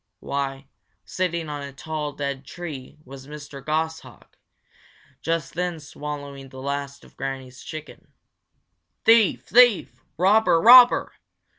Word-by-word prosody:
Why, 140 0 -4 0.4
sitting 170 -3 -2
on 145 -1 -5
a 140 0 -7
tall, 150 +1 -5
dead 140 -1 -4
tree 150 -4 -9
was 135 +1 -12
Mr. 150 -2 -10
Goshawk, 160 +2 -4 0.9
just 165 -4 -2
then 175 -1 -3
swallowing 145 -2 -8
the 130 - -11
last 140 +1 -5
of - - -19
Granny's 135 -1 -6
chicken. 155 -1 -10 1.0
"Thief! 225 -3 +4
thief! 245 -3 +4 0.2
robber! 190 0 +4
robber!" 245 +5 +7
150 Hz, 115 wpm, -24 LUFS, 140-170 Hz, 1.0 s, robber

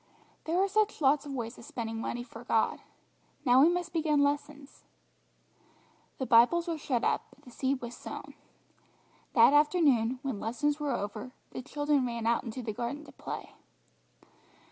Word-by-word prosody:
There 335 +3 +1
are 390 - +3
such 430 +2 +1
lots 290 0 +3
of 280 - -5
ways 235 -1 -5
of - - -12
spending 225 -1 -5
money 240 +1 -3
for 230 -1 -11
God. 225 - +1 0.7
Now 250 +1 +6
we 310 - +7
must 350 -1 -2
begin 305 -3 +2
lessons." 285 0 -3 1.3
The 260 - -2
Bibles 255 +9 +5
were 330 -2 -2
shut 255 -5 -1
up, - - 0
but - - -23
the 250 - -12
seed 265 +2 -1
was 240 0 -6
sown. - - -8 1.0
That - - +7
afternoon, 290 -6 +3
when 265 -7 -3
lessons 290 +8 -1
were 295 -1 -2
over, 215 +4 -5 0.2
the - - -5
children 290 0 0
ran 235 -1 -4
out 230 0 +2
into 245 +1 -6
the 220 -2 -3
garden 260 +7 -4
to - - -13
play. - - -7
270 Hz, 165 wpm, -30 LUFS, 235-300 Hz, 1.3 s, we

